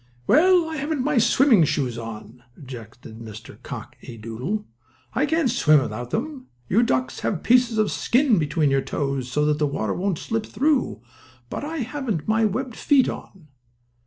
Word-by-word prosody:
"Well, 350 - +5
I 320 -1 -4
haven't 290 -1 -2
my 290 -2 +2
swimming 235 - +5
shoes 135 -5 0
on," 115 +1 -9
objected 120 -4 -11
Mr. 110 -1 -11
Cock - - -8
A. 115 - -10
Doodle. 125 - -4 0.5
"I 290 - +1
can't 320 -5 +1
swim 155 -11 +5
without 120 -1 -4
them. 260 - -4 0.2
You 210 - +3
ducks 130 - 0
have 180 - -2
pieces 245 -2 +3
of 215 -1 +2
skin 250 -5 +2
between 150 -1 +1
your 135 0 +2
toes, 135 -3 -3
so 150 +1 +2
the 150 0 0
water 110 -7 -2
won't 190 -2 -1
slip 225 +4 -3
through, 280 - 0 0.5
but - - -4
I 310 0 -3
haven't 245 - -3
my 220 +1 +3
webbed 230 +4 -2
feet 275 -3 +3
on." 170 -6 -9
195 Hz, 165 wpm, -23 LUFS, -, 0.5 s, Well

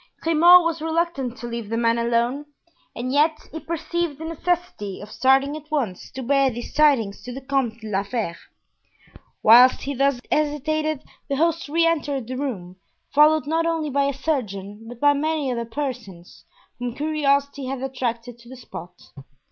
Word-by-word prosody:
Grimaud 340 +2 +7
was 330 -1 -1
reluctant 320 -6 -1
to 240 - -7
leave 235 -3 -5
the 230 - -1
man 230 0 +2
alone 235 +4 0 0.5
and 255 +2 -3
yet 305 +2 +3
he 320 - -6
perceived 335 -1 -3
the 320 - -7
necessity 330 - -3
of 210 +1 -10
starting 270 +2 +3
at 305 0 -10
once 250 - -2
to 260 - -5
bear 275 +1 +3
these 240 -1 -7
tidings 265 -10 +3
to 250 - -8
the 260 - -6
Comte 260 -4 -2
de 220 - -8
la 195 0 +1
Fere. 205 -4 -3 1.1
Whilst 245 +4 +7
he 280 - -3
thus 275 -1 +1
hesitated 305 0 0 0.3
the 280 - 0
host 330 +1 0
re 330 +2 +2
entered 290 -6 0
the 255 +3 -5
room, 200 -10 -5 0.4
followed 305 +1 +5
not 325 +2 0
only 320 -3 -1
by 280 +1 +2
a 280 - +1
surgeon, 225 -7 -4
but 240 0 -10
by 290 +1 +5
many 300 -1 -1
other 235 -1 -2
persons, 230 -9 -7 0.3
whom 245 -1 -4
curiosity 280 -2 0
had 265 0 -4
attracted 245 -2 -4
to 235 0 -16
the 260 - -10
spot. 180 -7 -10
275 Hz, 170 wpm, -23 LUFS, 235-305 Hz, 1.1 s, Grimaud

